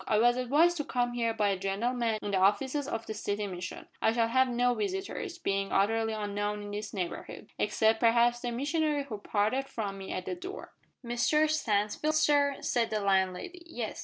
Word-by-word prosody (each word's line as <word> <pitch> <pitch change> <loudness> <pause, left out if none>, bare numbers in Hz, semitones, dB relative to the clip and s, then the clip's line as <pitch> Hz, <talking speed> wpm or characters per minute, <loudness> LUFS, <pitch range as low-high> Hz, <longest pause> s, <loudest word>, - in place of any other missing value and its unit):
I 215 - +3
was 240 +2 +5
advised 295 +8 +3
to 295 - -1
come 245 -3 -1
here 230 -1 0
by 215 -2 +1
a 195 -2 -1
gentleman 225 +4 0
in 205 - -2
the 190 - +2
offices 260 +9 +2
of 225 -5 -3
the 220 - -4
City 210 -1 -2
Mission. 180 -2 -6 0.2
I 220 - +3
shall 230 -1 +2
have 260 +2 +4
no 245 0 +2
visitors 385 - -3
being 195 - -1
utterly 225 +3 +2
unknown 205 0 -2
in 205 - -7
this 210 +1 -5
neighbourhood 180 -4 -5
except, 220 0 +2
perhaps, 235 +1 +4
the 245 - -3
missionary 295 +3 0
who 225 -7 -7
parted 215 +7 0
from 200 -5 -4
me 190 - -7
at 185 - -4
the - - -3
door 370 +3 -8 0.2
" - - -22
"Mr 300 +6 +2
Stansfield, 255 0 0
sir?" 285 -2 +3
said 235 -2 +1
the 215 - -1
landlady. 195 - 0
"Yes. 235 -9 -5
230 Hz, 195 wpm, -30 LUFS, 205-275 Hz, 0.2 s, was